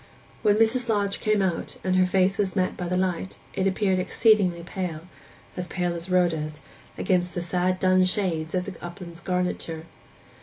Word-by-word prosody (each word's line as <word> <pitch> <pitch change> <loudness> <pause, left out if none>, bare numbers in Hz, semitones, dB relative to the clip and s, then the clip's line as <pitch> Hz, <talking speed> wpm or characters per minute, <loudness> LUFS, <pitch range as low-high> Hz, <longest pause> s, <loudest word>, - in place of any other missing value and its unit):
When 210 -2 +4
Mrs. 230 +2 +2
Lodge 200 -2 +1
came 215 -2 +2
out, 175 -3 -2
and 185 0 +1
her 185 0 +4
face 190 +2 +2
was 195 -2 0
met 185 -2 +1
by 180 - -4
the 180 +1 0
light, 185 0 -1 0.2
it 190 - +1
appeared 190 -1 +1
exceedingly 185 -3 +3
pale—as 180 0 -7
pale 175 0 -1
as 170 +2 -6
Rhoda's—against 175 +1 -1
the 175 - -1
sad 180 +2 0
dun 185 0 +4
shades 180 -4 0
of 180 0 0
the 200 - -6
upland's 175 -1 -8
garniture. 180 -3 -2
185 Hz, 160 wpm, -25 LUFS, 175-195 Hz, 0.2 s, When